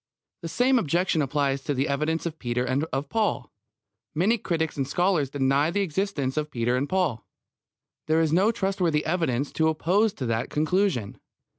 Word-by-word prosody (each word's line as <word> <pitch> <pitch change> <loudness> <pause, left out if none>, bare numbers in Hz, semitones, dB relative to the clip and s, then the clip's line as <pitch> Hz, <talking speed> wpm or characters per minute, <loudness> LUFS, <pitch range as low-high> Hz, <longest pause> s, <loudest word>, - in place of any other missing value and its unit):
The 165 - -5
same 250 +8 +3
objection 170 -1 +1
applies 140 -1 0
to 145 - -2
the 135 +2 0
evidence 155 +4 -1
of 160 -2 -4
Peter 125 0 -1
and 130 +4 0
of 140 -2 -3
Paul. 210 - -1 0.6
Many 210 +9 +2
critics 160 -4 -2
and 135 -2 -2
scholars 175 -3 +1
deny 140 +2 +1
the 200 +4 0
existence 165 -7 -2
of 150 0 -1
Peter 120 -2 0
and 140 +3 -1
Paul. 175 - 0 0.8
There 160 +1 +3
is 160 -1 +1
no 195 +6 +4
trustworthy 190 -7 0
evidence 150 -6 0
to 160 - +1
oppose 185 +7 +2
to 130 - -5
that 115 +1 -1
conclusion. 155 - 0
155 Hz, 170 wpm, -26 LUFS, 135-180 Hz, 0.8 s, no